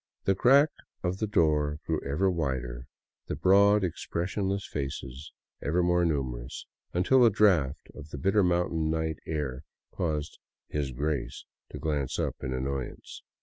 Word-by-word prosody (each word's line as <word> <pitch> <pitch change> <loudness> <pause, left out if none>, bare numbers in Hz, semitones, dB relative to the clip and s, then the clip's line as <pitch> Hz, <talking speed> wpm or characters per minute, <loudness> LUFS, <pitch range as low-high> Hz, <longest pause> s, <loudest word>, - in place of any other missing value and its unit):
The 95 - +3
crack 135 +9 +5 0.3
of 90 +1 -1
the 110 - 0
door 75 -7 +2
grew 80 -1 -1
ever 70 +8 +1
wider, 65 -7 -3 0.4
the - - -2
broad, 100 +2 +5
expressionless 95 +3 -2
faces 70 0 -5 0.3
ever 85 +5 +1
more 90 0 +3
numerous, 65 -5 -3 0.3
until 125 +9 +4
a 120 - +7
draft 90 -10 +2
of 75 - -10
the 75 - -6
bitter 95 +9 +3
mountain 85 -3 +1
night 80 0 -1
air 75 -5 -3 0.3
caused 75 -4 -3 0.2
" - - -65
His 70 -3 -1
Grace 70 +2 -3
" - - -63
to - - -6
glance 70 -3 -2
up - - -1
in 65 - -4
annoyance. 65 0 -4
80 Hz, 150 wpm, -28 LUFS, 70-95 Hz, 0.4 s, a